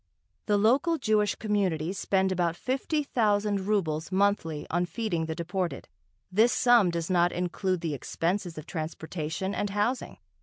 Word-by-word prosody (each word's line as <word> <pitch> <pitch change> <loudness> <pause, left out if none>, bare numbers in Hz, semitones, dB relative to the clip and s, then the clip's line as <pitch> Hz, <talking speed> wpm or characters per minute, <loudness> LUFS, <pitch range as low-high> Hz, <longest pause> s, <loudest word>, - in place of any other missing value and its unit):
The 205 -1 +3
local 265 +11 +3
Jewish 210 -5 +1
communities 190 -5 -1
spend 190 -1 +1
about 175 -2 0
fifty 270 - -1
thousand 205 -6 +1
rubles 165 -6 0
monthly 190 -6 +1
on 175 +1 +1
feeding 170 -4 -2
the 160 - -3
deported. 175 +2 -3 0.4
This 220 +6 +4
sum 235 -4 +5
does 170 +1 -2
not 175 -1 +3
include 180 0 -1
the 165 -3 -2
expenses 170 +5 -2
of 155 - -7
transportation 160 +2 -4
and 205 - -1
housing. 210 +6 -1
190 Hz, 145 wpm, -28 LUFS, 170-210 Hz, 0.4 s, sum